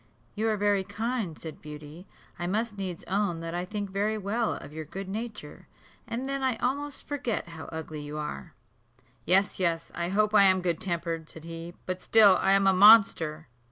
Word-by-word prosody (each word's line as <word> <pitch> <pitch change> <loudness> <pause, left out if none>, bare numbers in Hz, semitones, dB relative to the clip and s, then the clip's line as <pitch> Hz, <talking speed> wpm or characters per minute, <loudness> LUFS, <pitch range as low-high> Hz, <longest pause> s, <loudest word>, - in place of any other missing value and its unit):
"You 220 +2 0
are 215 - +1
very 205 -1 +2
kind," 205 -3 -3
said 160 -2 -8
Beauty: 150 +4 -10 0.3
"I 175 - -2
must 215 +3 -1
needs 185 -4 -5
own 190 -3 -1
that 165 0 -5
I 175 +1 -2
think 205 0 -5
very 210 +3 0
well 215 +3 -1
of 145 - -10
your 160 0 -5
good 190 +5 -7
nature, 210 -6 -7 0.4
and 240 +3 -4
then 275 0 -2
I 260 -2 +1
almost 280 +4 -3
forget 270 -10 -3
how 165 -1 -9
ugly 160 -1 -6
you 145 +1 -6
are." 110 - -6 0.7
"Yes, 195 +3 +2
yes, 165 -2 0
I 170 0 -2
hope 210 +2 +2
I 200 -2 +7
am 185 -1 +4
good 170 -2 -1
tempered," 170 -3 -3
said 160 - -10
he, 165 +1 -8
"but 185 0 -4
still 205 -4 +6
I 195 - +4
am 195 0 +4
a 195 - +5
monster." 185 -7 +6
190 Hz, 190 wpm, -28 LUFS, 165-215 Hz, 0.7 s, I